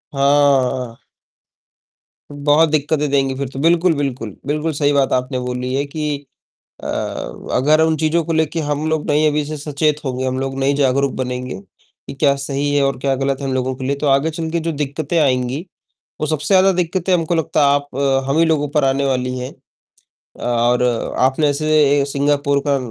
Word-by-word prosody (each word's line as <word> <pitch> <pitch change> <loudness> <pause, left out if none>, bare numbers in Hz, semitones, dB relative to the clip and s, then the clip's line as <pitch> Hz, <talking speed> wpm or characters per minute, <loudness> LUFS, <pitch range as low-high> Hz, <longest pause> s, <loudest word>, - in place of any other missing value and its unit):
हाँ। 135 -4 +2 1.3
बहुत 145 +2 +3
दिक्कतें 150 0 0
देंगी, 135 -1 +1
फिर 140 -1 -3
तो। 135 - -8
बिल्कुल, 170 +2 +3
बिल्कुल, 130 -7 -3
बिल्कुल 150 +2 -1
सही 145 0 +1
बात 140 -1 +2
आपने 125 0 -1
बोली 125 +1 -3
है 140 +2 0
कि 145 -1 -4 0.6
अ, - - -4 0.6
अगर 150 +5 +3
उन 160 0 +3
चीज़ों 160 +2 +1
को 165 - -2
लेके 160 +1 0
हम 150 +1 -2
लोग 160 -1 -1
नहीं 150 +1 +3
अभी 150 0 0
से 155 +1 -5
सचेत 150 +1 0
होंगे, 130 0 -2
हम 130 0 -1
लोग 135 0 -3
नहीं 140 +1 +1
जागरूक 140 -1 +1
बनेंगे 125 -1 -4
कि 100 - -15
क्या 140 0 +2
सही 140 +1 -2
है 140 - +3
और 135 -2 0
क्या 135 0 0
गलत 135 +1 -1
है, - - -3
हम 130 - -1
लोगों 130 0 -1
के 130 0 -6
लिए, 140 +1 0
तो 145 +1 -2
आगे 140 +4 +3
चलके 160 +1 -3
जो - - +1
दिक्कतें 150 +2 -3
आएँगी, 130 -1 +1 0.6
वो 155 - 0
सबसे 155 -2 -2
ज़्यादा 190 +1 +5
दिक्कतें 180 +1 -1
हमको 170 0 0
लगता 160 -1 0
है 140 - +4
आप 145 0 -2 0.4
हम 140 +4 +1
ही 165 - +5
लोगों 150 -3 +1
पर 150 -1 +1
आने 135 +1 +1
वाली 125 -1 -1
है। 125 +1 -5 0.9
और 120 +1 +1 0.4
आपने 135 +4 +2
ऐसे 145 -1 +2
सिंगापुर 140 0 +1
का 140 -1 +3
140 Hz, 185 wpm, -18 LUFS, 135-155 Hz, 1.3 s, ज़्यादा